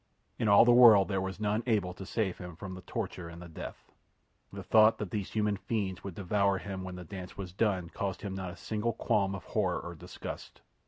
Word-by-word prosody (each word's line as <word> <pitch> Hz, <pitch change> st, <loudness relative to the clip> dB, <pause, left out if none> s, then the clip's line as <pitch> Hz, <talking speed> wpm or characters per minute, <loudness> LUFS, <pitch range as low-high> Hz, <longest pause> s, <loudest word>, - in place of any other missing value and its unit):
In 110 Hz, -, +1 dB
all 100 Hz, +2 st, +8 dB
the 120 Hz, -, +6 dB
world 115 Hz, -5 st, +8 dB
there 95 Hz, -2 st, 0 dB
was 95 Hz, +1 st, -4 dB
none 105 Hz, +1 st, 0 dB
able 100 Hz, -6 st, +1 dB
to 95 Hz, +1 st, -9 dB
save 100 Hz, -5 st, -1 dB
him 90 Hz, -2 st, -8 dB
from 95 Hz, +2 st, -7 dB
the 95 Hz, -, -8 dB
torture 90 Hz, -3 st, -5 dB
and 85 Hz, 0 st, -10 dB
the 90 Hz, -, -9 dB
death. 80 Hz, -, -9 dB, 0.6 s
The -, -, -7 dB
thought 110 Hz, 0 st, +5 dB
that 105 Hz, -4 st, -5 dB
these 105 Hz, -3 st, -3 dB
human 105 Hz, -2 st, +1 dB
fiends 95 Hz, -1 st, -3 dB
would 95 Hz, -4 st, -6 dB
devour 100 Hz, +1 st, +1 dB
him 95 Hz, -1 st, -5 dB
when 90 Hz, -1 st, -6 dB
the 90 Hz, -, -7 dB
dance 90 Hz, +1 st, -8 dB
was 95 Hz, -3 st, -6 dB
done 95 Hz, -5 st, 0 dB
caused 95 Hz, -2 st, -3 dB
him 100 Hz, -2 st, -4 dB
not 95 Hz, -1 st, -4 dB
a 90 Hz, -, -9 dB
single 110 Hz, +2 st, -2 dB
qualm 100 Hz, -2 st, +1 dB
of 90 Hz, -, -8 dB
horror -, -, 0 dB
or 85 Hz, -, -7 dB
disgust. 80 Hz, -, -8 dB
95 Hz, 225 wpm, -31 LUFS, 90-105 Hz, 0.6 s, all